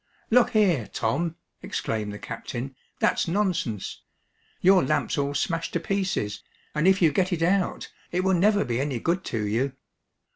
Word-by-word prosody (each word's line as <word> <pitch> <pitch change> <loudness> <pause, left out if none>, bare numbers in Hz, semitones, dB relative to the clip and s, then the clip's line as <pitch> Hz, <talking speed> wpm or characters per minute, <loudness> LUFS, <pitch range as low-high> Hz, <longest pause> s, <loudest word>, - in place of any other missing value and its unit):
"Look 245 +1 +5
here, 180 - +3
Tom!" 165 +9 -1 0.3
exclaimed 105 -2 -3
the 105 - -6
captain, 120 +4 -6 0.2
"that's - - +2
nonsense. 175 - -1 0.6
Your 190 0 +5
lamp's 130 - 0
all 140 0 -1
smashed 165 +3 -1
to 170 - +1
pieces, 185 - -1 0.3
and 150 +3 +2
if 190 -1 +4
you 160 - +6
get 185 +6 +1
it 165 -2 0
out, 185 +2 0 0.2
it 180 +1 0
will 190 0 +3
never 205 +3 +3
be 120 +1 -1
any 140 -3 -1
good 170 +10 0
to 110 -3 -2
you." 120 +6 0
165 Hz, 160 wpm, -26 LUFS, 125-190 Hz, 0.6 s, you